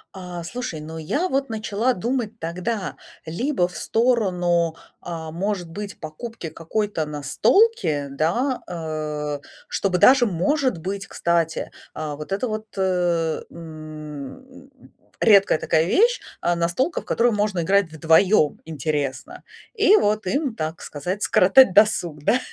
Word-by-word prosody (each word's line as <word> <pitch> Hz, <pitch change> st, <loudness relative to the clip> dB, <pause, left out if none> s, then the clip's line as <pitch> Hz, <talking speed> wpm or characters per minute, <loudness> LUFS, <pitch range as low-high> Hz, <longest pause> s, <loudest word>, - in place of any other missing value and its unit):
А, 180 Hz, -2 st, -7 dB
слушай, 180 Hz, -4 st, -5 dB
ну, 160 Hz, +1 st, -7 dB
я 290 Hz, -, -1 dB
вот 275 Hz, -4 st, -1 dB
начала 220 Hz, +3 st, 0 dB
думать 230 Hz, +2 st, -3 dB
тогда 180 Hz, +5 st, -3 dB, 0.3 s
либо 180 Hz, -, 0 dB
в 180 Hz, -, -13 dB
сторону, 180 Hz, -8 st, +1 dB, 0.3 s
а, 165 Hz, -2 st, -6 dB
может 185 Hz, +1 st, -2 dB
быть 205 Hz, +2 st, -7 dB
покупки 165 Hz, +4 st, -7 dB
какой-то 165 Hz, +2 st, -2 dB
настолки, 150 Hz, -, +2 dB
да. 210 Hz, -, 0 dB
А, 155 Hz, -3 st, -4 dB, 0.3 s
чтобы 190 Hz, -2 st, 0 dB
даже 255 Hz, +6 st, +6 dB
может 255 Hz, -, 0 dB
быть, 195 Hz, +5 st, -5 dB
кстати, 170 Hz, -1 st, -1 dB, 0.2 s
а, 155 Hz, -2 st, -4 dB
вот 150 Hz, +5 st, -9 dB
это 200 Hz, +6 st, -1 dB
вот, 215 Hz, 0 st, -4 dB
э, 175 Hz, -4 st, +1 dB
м, 155 Hz, -, -10 dB, 0.5 s
редкая 200 Hz, -6 st, +5 dB
такая 160 Hz, +1 st, +1 dB
вещь, 470 Hz, -, +3 dB, 0.2 s
а, 175 Hz, -, +1 dB
настолка, 175 Hz, -, 0 dB
в -, -, -20 dB
которую 235 Hz, 0 st, +2 dB
можно 205 Hz, -3 st, 0 dB
играть 195 Hz, -1 st, +2 dB
вдвоем 160 Hz, +1 st, +3 dB
интересно, 145 Hz, -4 st, -3 dB, 0.3 s
и 425 Hz, -2 st, +5 dB
вот 210 Hz, -, +1 dB
им, 275 Hz, +3 st, -1 dB
так 155 Hz, -3 st, -4 dB
сказать, 180 Hz, +8 st, -4 dB
скоротать 195 Hz, +3 st, +6 dB
досуг, 180 Hz, -7 st, +3 dB
да. 245 Hz, -, +3 dB
180 Hz, 130 wpm, -23 LUFS, 160-225 Hz, 0.5 s, даже